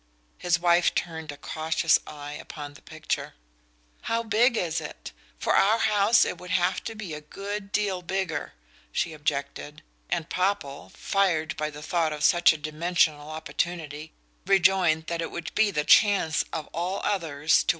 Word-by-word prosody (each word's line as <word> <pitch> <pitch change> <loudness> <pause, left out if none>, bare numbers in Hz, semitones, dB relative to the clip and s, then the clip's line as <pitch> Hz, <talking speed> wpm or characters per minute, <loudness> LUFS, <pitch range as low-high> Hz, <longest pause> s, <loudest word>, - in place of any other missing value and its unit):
His 175 -1 +1
wife 175 0 +3
turned 160 -3 -3
a 145 - -10
cautious 160 +2 +1
eye 145 -1 -8
upon 150 -1 -8
the 145 - -16
picture. - - -4 0.7
"How 230 0 +1
big 230 +2 +3
is 170 -4 -1
it? - - -8 0.3
For - - +1
our 215 +3 +4
house 215 0 +4
it 180 - -4
would 180 - -10
have 185 0 +1
to 225 - -5
be 200 -7 -6
a 150 - -6
good 200 +5 -6
deal 200 -4 0
bigger," 175 - -3 0.4
she 165 - -1
objected; 145 0 -4 0.3
and 170 -2 -1
Popple, 185 -7 -2
fired 175 -6 0
by 150 0 -2
the 150 0 -10
thought 165 -2 0
of 150 0 -5
such 175 +2 +6
a 160 - -3
dimensional 155 0 0
opportunity, 155 0 -4 0.4
rejoined 180 -4 +4
that 170 0 -3
it 165 - -3
would 170 -1 -6
be 220 -1 +3
the 150 -6 -1
chance 195 -7 +4
of 155 - -4
all 180 +4 -2
others 155 -6 +2
to. - - -3
170 Hz, 165 wpm, -26 LUFS, 155-195 Hz, 0.7 s, such